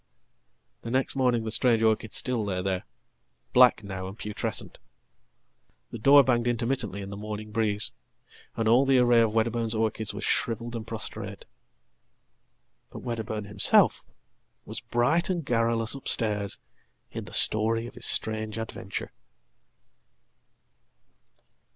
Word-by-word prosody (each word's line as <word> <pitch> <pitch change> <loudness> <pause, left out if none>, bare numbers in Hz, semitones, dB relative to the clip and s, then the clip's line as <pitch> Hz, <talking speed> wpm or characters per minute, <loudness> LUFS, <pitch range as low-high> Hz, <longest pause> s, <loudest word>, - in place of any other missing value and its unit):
The 115 - -7
next 130 +3 0
morning 125 -3 +1
the 110 - -4
strange 115 -1 +2
orchid 110 -1 +1
still 125 -4 -1
lay 95 -3 -3
there, 95 -1 -2 0.7
black 125 -3 +5
now 95 -2 -6
andputrescent. 105 +1 -6 1.1
The 115 - -7
door 140 +5 +7
banged 120 -2 +1
intermittently 115 -4 -2
in 95 - -8
the - - -6
morning 105 +1 -7
breeze, 105 -2 +1 0.7
and 115 - 0
allthe 125 +4 +4
array 120 -1 +4
of 115 -2 +2
Wedderburn's 115 0 0
orchids 110 -1 -1
was 100 +1 -7
shrivelled 120 +2 -1
and 110 -2 -6
prostrate. - - -6 1.5
ButWedderburn 110 -3 -5
himself 100 0 +2 0.6
was - - -6
bright 125 +10 0
and 175 -5 -2
garrulous 115 -2 0
upstairs 105 -7 +1 0.5
in - - -6
the - - +9
glory 115 +2 -1
of 120 - -10
hisstrange 110 -2 0
adventure. 110 -1 -6
115 Hz, 120 wpm, -26 LUFS, 105-120 Hz, 1.5 s, the